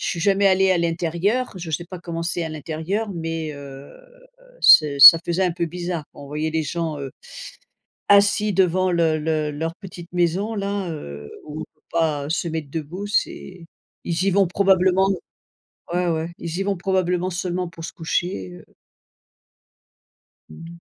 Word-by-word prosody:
je - - -3
suis 170 - -2
jamais 200 +1 +3
allée 190 0 +4
à 185 - +3
l'intérieur, 170 +8 -1
je 170 -3 -6
sais 170 +4 -2
pas 185 0 -9
comment 170 -1 -5
c'est 170 0 -2
à 160 - -4
l'intérieur, 160 +7 -4
mais 165 -2 -4
heu, 140 -1 -11 0.7
c'est 145 -3 +6
ça 150 +5 +12
faisait 175 +2 0
un 180 - +1
peu 170 0 -2
bizarre, 175 -1 -4
quoi. - - -12
On - - -10
voyait 150 +2 -2
les 160 0 0
gens, 160 -1 -3
heu, 135 -1 -6 1.0
assis 205 +1 +4
devant 185 0 +2
le 165 -2 +2
le 155 -1 -1
leur 160 +3 -4
petite 175 -3 -11
maison-là, 195 +3 -1
heu, 75 - -8 0.2
où 155 +1 -7
on - - -4
peut - - -34
pas 155 -4 0
se 170 +1 -1
mettre 160 -3 -4
debout. 165 +7 -5
C'est 185 -3 -2 0.4
ils 170 +1 -1
y 195 - +3
vont 195 0 +3
probablement 190 0 +3 0.8
ouais, 180 0 0
ouais, 165 +1 -2
ils 170 +1 -5
y - - 0
vont 200 0 -1
probablement 180 -1 0
seulement 180 0 -3
pour 165 -1 -11
se - - -6
coucher, 160 - -3
heu - - -13 1.9
Mmh 80 - -11
mh. 170 - -12
170 Hz, 170 wpm, -22 LUFS, 160-185 Hz, 1.9 s, ça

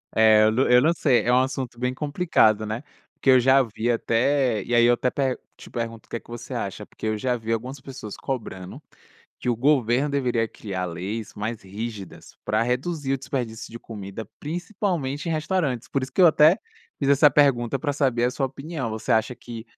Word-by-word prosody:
É, 110 -1 +6
eu 110 - +5
n 130 +4 +2
eu 125 - +7
não 160 - +4
sei, 130 -7 +2
é 120 - +1
um 125 - +5
assunto 130 -2 -2
bem 125 0 0
complicado, 140 -8 +2
né, 110 +5 -4 0.3
porque 135 - -1
eu 130 -1 +8
já 130 +2 +5
vi 115 0 -1
até 120 -1 +1
e 120 - -4
aí 120 - +5
eu 120 0 +5
até 125 - -1
pe 135 -2 0 0.2
te - - -13
pergunto 115 -2 -5
o - - -37
que 115 - -4
que - - -24
você 120 - -8
acha, - - -4
porque - - -10
eu 110 0 0
já 125 +3 -1
vi 115 0 -2
algumas 130 +4 -4
pessoas 130 -6 -9
cobrando 100 -9 -6 0.6
que - - -6
o 120 - +2
governo 130 +1 +2
deveria 125 -5 0
criar 95 -4 -5
leis 100 +6 -5
mais 110 +2 -4
rígidas 100 0 -8
para 110 +1 +1
reduzir 135 +4 -1
o 135 - 0
desperdício 120 -5 -4
de 115 - -7
comida, 105 -2 -8
principalmente 170 -3 -3
em - - 0
restaurantes, 155 -6 -1
por 135 - -1
isso 130 - -5
que 185 - +1
eu - - +9
até 160 +3 +6 0.4
fiz 140 - -1
essa 140 +1 +6
pergunta 135 -4 +3
pra 145 0 -2
saber 130 -4 +1
a 125 - +2
sua 135 0 -1
opinião, 140 -1 -5
você 110 0 -3
acha 115 +3 +2
que 115 -2 -9
125 Hz, 210 wpm, -24 LUFS, 115-140 Hz, 0.6 s, eu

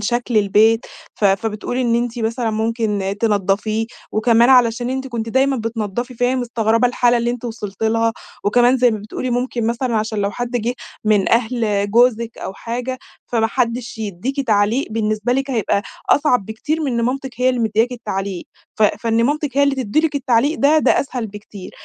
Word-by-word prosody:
شكل 240 +2 -1
البيت. 215 +3 +3 0.3
ف 210 - -4
فبتقول 210 +4 0
إن 240 -2 +1
أنتِ 240 0 -1
مثلًا 230 +1 -1
ممكن 215 -3 -1
تنضفيه، 215 +1 0 0.3
وكمان 230 +2 +4
علشان 245 -1 +4
أنتِ 265 0 -3
كنتِ 230 -3 -4
دايمًا 265 +3 +2
بتنضفي 225 +2 -3
فهي 245 +2 +1
مستغربة 230 -1 +1
الحالة 245 0 +2
اللي 235 0 0
أنتِ 245 0 -5
وصلتِ 215 -3 -6
لها. 225 +1 +2 0.3
وكمان 245 +4 +4
زي 250 -1 +4
ما 215 - -2
بتقولي 215 +4 -5
ممكن 245 -1 -1
مثلًا 235 0 -1
عشان 215 0 -2
لو 200 0 0
حد 245 +3 -4
جه 245 0 -1 0.3
من 210 -3 +3
أهل 220 -4 +1
جوزِك 235 0 +2
أو - - -5
حاجة 245 +4 -4 0.3
فما 225 -2 +1
حدش 240 -1 -2
يديكِ 220 +7 -3
تعليق، 215 +5 +2
بالنسبة 215 +1 -1
لكِ 270 +1 -1
هيبقى 220 -4 0 0.3
أصعب 255 -8 +3
بكتير 295 +9 -3
من 270 -4 -1
إن 235 - 0
مامتِك 265 +2 -2
هي 255 - +4
اللي 250 -2 0
مدياكِ 225 +2 +1
التعليق. 195 -5 -4 0.3
ف 220 - +2
فإن 225 +2 +2
مامتِك 290 -1 -1
هي 285 - +5
اللي 280 -1 +3
تدّي 260 +2 0
لكِ 320 -2 -1
التعليق 275 +2 +1
ده، 295 +3 +4
ده - - +3
أسهل 250 -4 -4
بكتير. 205 -2 -10
230 Hz, 180 wpm, -19 LUFS, 215-250 Hz, 0.3 s, هي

